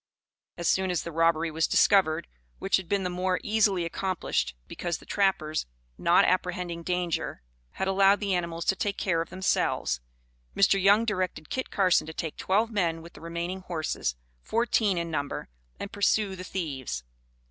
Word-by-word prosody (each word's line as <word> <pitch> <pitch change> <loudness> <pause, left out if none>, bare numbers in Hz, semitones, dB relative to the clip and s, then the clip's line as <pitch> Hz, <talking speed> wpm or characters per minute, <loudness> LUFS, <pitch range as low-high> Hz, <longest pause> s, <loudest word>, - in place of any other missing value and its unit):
As 170 - -2
soon 190 0 +2
as 180 -2 0
the 170 - -6
robbery 165 0 +2
was 160 +1 +1
discovered, 160 - +3 0.3
which 195 - +2
had 185 -3 -7
been 200 -1 +1
the 180 - -1
more 180 +1 0
easily 205 -5 +2
accomplished 175 - -1
because 175 -2 -3
the - - -16
trappers, 175 - 0 0.3
not - - +4
apprehending 180 -2 -1
danger, 175 - -2 0.3
had 190 - -2
allowed 195 +1 +4
the 200 -2 -1
animals 170 -2 -2
to 195 - +3
take 200 +1 -2
care 170 -4 +1
of 165 - -5
themselves, 185 - 0 0.6
Mr. 195 0 +4
Young 205 +4 +5
directed 185 -7 -2
Kit 260 - -2
Carson 185 -5 +3
to 160 - -6
take 160 -1 -4
twelve 215 +5 +1
men 170 -6 0
with 170 - -12
the - - -13
remaining 170 +3 -4
horses, 160 - -2 0.3
fourteen 220 -4 +1
in 170 -1 -2
number, 145 -2 -3 0.3
and 200 - -5
pursue 205 -1 +2
the 185 - -7
thieves. 135 - -4
180 Hz, 170 wpm, -28 LUFS, 165-195 Hz, 0.6 s, Young